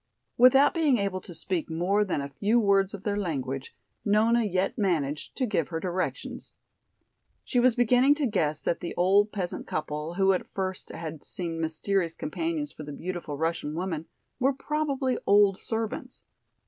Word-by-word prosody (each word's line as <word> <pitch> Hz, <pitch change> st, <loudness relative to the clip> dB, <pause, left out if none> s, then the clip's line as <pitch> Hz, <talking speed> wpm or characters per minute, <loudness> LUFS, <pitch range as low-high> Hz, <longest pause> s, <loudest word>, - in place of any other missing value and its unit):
Without 255 Hz, +3 st, +6 dB
being 305 Hz, -6 st, +3 dB
able 195 Hz, -2 st, -1 dB
to 175 Hz, -, -10 dB
speak 170 Hz, +1 st, -2 dB
more 180 Hz, +6 st, +1 dB
than 180 Hz, -7 st, -1 dB
a 140 Hz, -, -5 dB
few 210 Hz, -, +2 dB
words 200 Hz, -2 st, +3 dB
of 195 Hz, -, -11 dB
their 205 Hz, -1 st, -1 dB
language, 135 Hz, -7 st, -3 dB, 0.3 s
Nona 225 Hz, +3 st, +3 dB
yet 190 Hz, -2 st, 0 dB
managed 155 Hz, -8 st, -1 dB
to 260 Hz, -, +1 dB
give 195 Hz, -, 0 dB
her 165 Hz, -, -3 dB
directions. 180 Hz, +1 st, -4 dB, 0.9 s
She 250 Hz, -, 0 dB
was 245 Hz, -1 st, +4 dB
beginning 250 Hz, +3 st, +4 dB
to 295 Hz, -2 st, 0 dB
guess 155 Hz, -, 0 dB
that 170 Hz, -, 0 dB
the 170 Hz, -, -5 dB
old 200 Hz, +4 st, +4 dB
peasant 185 Hz, -4 st, -4 dB
couple, 155 Hz, +2 st, -3 dB
who 195 Hz, 0 st, +4 dB
at 185 Hz, -, -3 dB
first 190 Hz, -1 st, -2 dB
had 160 Hz, -2 st, -7 dB
seemed 170 Hz, -3 st, -3 dB
mysterious 165 Hz, +2 st, 0 dB
companions 305 Hz, -, -3 dB
for -, -, -11 dB
the 150 Hz, -1 st, -7 dB
beautiful 170 Hz, -1 st, -5 dB
Russian 160 Hz, -1 st, -2 dB
woman, 165 Hz, -2 st, -3 dB, 0.3 s
were 270 Hz, +2 st, +3 dB
probably 275 Hz, -2 st, -1 dB
old 200 Hz, -1 st, +5 dB
servants. 225 Hz, -1 st, -4 dB
190 Hz, 165 wpm, -27 LUFS, 165-225 Hz, 0.9 s, Without